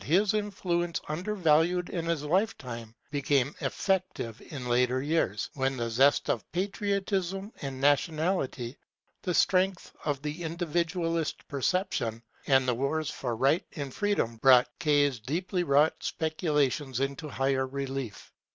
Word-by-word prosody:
s 195 +5 +4
influence, 180 -5 -1
undervalued 175 0 +2
in 170 -2 -2
his 165 -3 0
lifetime, 130 - -1 0.2
became 140 -1 +1
effective 185 - -1
in 130 -5 -6
later 125 +1 +2
years, 145 - 0
when 135 -1 -1
the 115 -1 -2
zest 135 +5 +4
of 115 - -2
patriotism 195 +1 -1
and 135 -2 -5
nationality, 145 -3 +1 0.5
the 180 - -2
strength 185 0 +2
of 145 -3 -1
the 150 +3 -4
individualist 170 0 -1
perception, 140 - -1 0.2
and 135 -2 +4
the 125 - +3
wars 140 +5 -1
for 120 -3 -3
right 135 +8 +2
and 140 -5 -5
freedom 205 - 0
brought 125 +1 +6
K.'s 145 -5 +3
deeply 175 - -1
wrought 150 0 +4
speculations 150 -5 0
into 140 +3 -2
higher 135 -1 0
relief. 135 -4 -5
150 Hz, 125 wpm, -29 LUFS, 130-175 Hz, 0.5 s, brought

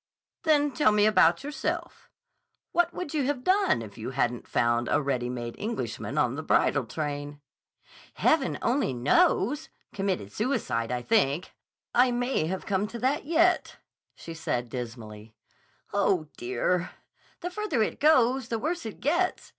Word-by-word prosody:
"Then 295 -2 +3
tell 265 -6 +3
me 210 0 +4
about 215 +5 +4
yourself. 290 +1 -4 0.6
What 345 0 +2
would 355 -4 -6
you 295 -4 +1
have 270 -2 -2
done 375 - +2
if 110 +1 -11
you 110 - -4
hadn't 125 -2 -1
found 120 0 +1
a - - 0
readymade 125 -4 -2
Englishman 225 +2 -4
on - - +2
the - - -4
bridal - - +2
train?" 145 -1 -4 0.8
"Heaven 300 -4 +2
only 250 - +1
knows! 195 - +2 0.2
Committed 190 - -2
suicide, 165 - -1
I 125 0 -2
think. 180 - +1 0.4
I 250 +1 +5
may 245 -8 0
have 190 +2 -3
to - - -16
come 200 +1 0
to 235 - -7
that 265 +5 0
yet," 340 +3 +2 0.4
she 165 - -9
said 125 -7 -3
dismally. 115 -3 -8 0.6
"Oh, 190 -6 +1
dear! 130 +9 -1 0.5
The 355 - -4
further 365 - 0
it - - -3
goes, 260 -4 +4
the 230 - -1
worse 320 +3 -3
it 215 - -9
gets. 345 +7 0
210 Hz, 150 wpm, -27 LUFS, -, 0.8 s, I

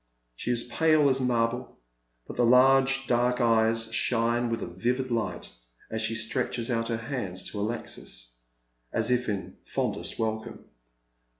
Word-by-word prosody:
Sha 115 - -5
is 120 -1 +1
pale 155 +2 +3
as 135 0 +1
marble, 120 -1 0 0.5
but - - -8
the 120 - +2
large 135 +2 +5
dark 125 +1 +2
eyes 115 -1 +2
shine 120 0 +1
with 115 - -2
a - - -2
vivid 125 +8 -2
light 115 -1 -2 0.4
as 110 0 -2
she 110 +1 -1
stretches 115 +1 -1
out 115 -1 0
her 115 -1 -1
hands 115 -7 -4
to 105 - -5
Alexis, - - -5 0.6
as 115 +2 0
if 125 -1 +1
in 100 -2 -4
fondest - - -2
welcome. 110 +1 -3
115 Hz, 145 wpm, -28 LUFS, 110-125 Hz, 0.6 s, large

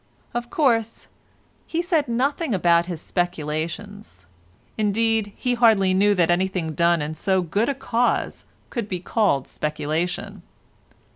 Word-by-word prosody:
Of 240 0 -3
course, 230 -7 +1 0.6
he 335 +1 -1
said 330 -5 +1
nothing 260 - 0
about 170 -1 +3
his 175 -3 -5
speculations—indeed, 175 - -3
he 250 - -1
hardly 220 -6 +4
knew 205 +2 +3
that 175 -2 +3
anything 180 -2 0
done 170 0 +2
in 150 +1 -4
so 190 +3 0
good 205 - 0
a 280 - -1
cause 245 -2 -1 0.3
could 230 -5 -3
be 180 - -2
called 185 - +1
speculation. 155 +3 -3
190 Hz, 125 wpm, -23 LUFS, 165-230 Hz, 0.6 s, hardly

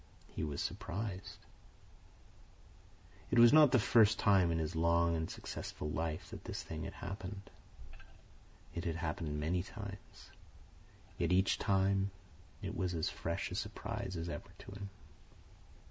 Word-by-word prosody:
He - - -2
was 75 -2 -2
surprised. 95 0 -5 1.8
It - - +1
was 120 +2 +9
not 150 -4 +8
the 130 - +6
first 110 -1 +5
time 95 -5 +4
in 80 - +1
his 80 +1 -2
long 85 +1 +3
and 80 0 -2
successful 75 - -5
life 80 -1 -3
that - - -8
this - - -4
thing - - -5
had - - -6
happened. 100 0 -6 1.2
It 85 - -3
had 85 -2 -1
happened 80 -2 -2
many 85 +4 +1
times, 100 +1 -9 0.9
yet 85 0 +1
each 95 +1 +3
time 95 0 +2 0.5
it - - -3
was 90 0 -1
as 80 - 0
fresh 85 +1 -3
a - - -3
surprise 105 -2 -4
as 85 +1 -3
ever 80 -4 -5
to - - -11
him. 100 0 -6
90 Hz, 145 wpm, -35 LUFS, 85-100 Hz, 1.8 s, was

